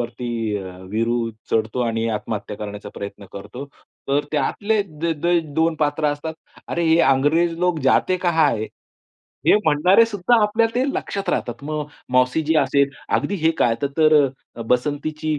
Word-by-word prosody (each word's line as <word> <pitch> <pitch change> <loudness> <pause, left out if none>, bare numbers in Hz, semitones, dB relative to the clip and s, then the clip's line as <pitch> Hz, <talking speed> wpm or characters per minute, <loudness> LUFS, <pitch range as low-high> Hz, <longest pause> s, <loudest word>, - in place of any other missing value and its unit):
वरती 120 +1 -5 0.3
अ, 95 -2 -7
वीरू 115 +1 0 0.2
चढतो 110 +2 0
आणि 115 -1 -1
आत्महत्या 105 -1 -4
करण्याचा 105 0 -7
प्रयत्न 100 0 -8
करतो. 105 +7 -8 0.4
तर 140 +1 +1
त्यातले 205 +9 0
दे 165 -2 -3
दे 170 +3 +1 0.2
दोन 160 0 +2
पात्र 150 +1 0
असतात. 160 +2 -6 0.3
अरे 170 0 -1
हे 160 +1 +4
अंग्रेज 150 +6 +3
लोग 180 -2 +1
जाते 185 +7 +3
कहा 160 -3 +4
है? 110 -3 -1 0.8
हे - - +7
म्हणणारे 180 +9 +5
सुद्धा 220 +2 +2
आपल्या 220 +2 +3
ते 255 +2 +1
लक्षात 200 -1 -4
राहतात. 120 +3 -3
मग 150 0 -3 0.3
मौसीजी 130 +5 +2
असेल 140 0 +2 0.3
अगदी 200 - -2
हे 160 - +5
काय 115 - +3
त - - +3
तर 155 0 +5 0.4
अ, 115 - -5
बसंतीची 150 +5 -1
145 Hz, 155 wpm, -21 LUFS, 115-165 Hz, 0.8 s, हे